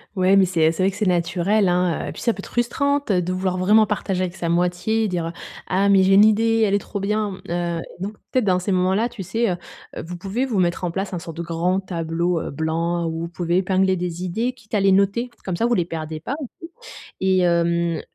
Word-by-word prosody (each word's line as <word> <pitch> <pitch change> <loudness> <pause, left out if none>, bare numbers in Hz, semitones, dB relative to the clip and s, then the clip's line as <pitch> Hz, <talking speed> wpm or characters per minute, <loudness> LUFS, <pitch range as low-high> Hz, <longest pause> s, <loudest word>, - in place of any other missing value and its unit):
Ouais, 190 +1 +4
mais 195 - +6
c'est 175 -2 -1
et 160 0 +5
c'est 175 +3 -2
vrai 195 - +3
que 195 - -10
c'est 210 - 0
naturel, 180 +3 +1
hein, 180 -1 +1
heu, - - -4
et - - -4
puis - - -9
ça 235 - +2
peut 195 - -14
être - - -6
frustrante 280 +2 0
de 180 -1 +1
vouloir 185 0 -1
vraiment 210 +4 +5
partager 195 -3 -2
avec 180 -1 -2
sa 170 - -3
moitié, 180 +6 +1
dire: 170 -2 -2 0.3
«Ah 195 +2 +2
mais 195 -1 +5
j'ai 190 +1 +4
une 200 +2 +8
idée, 225 +1 +3
elle 200 - 0
est - - +4
trop 200 0 -6
bien», 210 +1 0 0.2
mmh, - - -6
heu, 170 -1 -1 0.2
donc, 200 +3 -4 0.2
peut-être 255 -4 +1
dans 185 -2 +3
ces 185 +2 -2
moments-là, 190 +5 +2
tu 210 -5 -7
sais? 230 +5 0
Heu, 175 - -2 0.5
vous 175 +2 -6
pouvez 200 +8 -2
vous 230 -7 -1
mettre 175 0 0
en 175 - -1
place 195 +2 -3
un 180 - -2
sorte 165 -1 -9
de - - -3
grand 170 +3 0
tableau, 170 -1 -1
heu, - - -5
blanc 165 +3 -1
où 165 0 -3
vous 170 - -3
pouvez 175 0 -1
épingler 190 0 +2
des 175 0 -4
idées, 225 +8 -1
quitte 230 -4 -22
à 210 - +3
les 195 0 +4
noter. 200 +6 +2
Comme 185 -3 -3
ça, 230 - +1
vous 240 - +2
les 175 -6 +1
perdez 160 -2 -5
pas 265 - -3
aussi 295 - -4 0.8
et 190 0 +2
hem, 170 -1 +1
185 Hz, 250 wpm, -22 LUFS, 170-205 Hz, 0.8 s, une